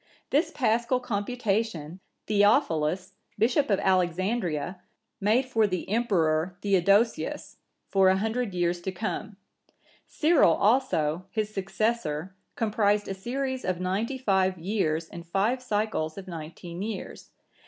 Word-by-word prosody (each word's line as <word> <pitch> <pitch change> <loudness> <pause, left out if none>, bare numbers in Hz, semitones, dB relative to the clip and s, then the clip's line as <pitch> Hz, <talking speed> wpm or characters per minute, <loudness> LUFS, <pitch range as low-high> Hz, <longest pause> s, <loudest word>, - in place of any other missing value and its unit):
This 300 +5 +3
Paschal 240 0 +1
computation, 205 - -2 0.3
Theophilus,(975) 195 - +2 0.3
Bishop 240 +6 +2
of 200 - +3
Alexandria, 180 -2 0 0.4
made 220 +6 +2
for 225 -4 +2
the 185 -3 -3
Emperor 180 -6 +1
Theodosius, 200 +3 +1 0.3
for 190 -1 +4
a 190 - +3
hundred 220 0 -2
years 175 0 0
to 190 - -3
come. 210 +1 -4 0.7
Cyril(976) 305 - +4
also, 195 - +2
his 215 0 -2
successor, 195 -4 -2 0.2
comprised 210 -2 +1
a 195 - -2
series 260 +6 -3
of 185 -2 -1
ninety 200 +8 -1
five 190 -6 +1
years 165 -3 -1
in 170 - -9
five 200 +9 0
cycles 210 -9 -1
of 195 -1 -8
nineteen 170 +1 -7
years. 210 -1 -6
200 Hz, 120 wpm, -27 LUFS, 180-225 Hz, 0.7 s, for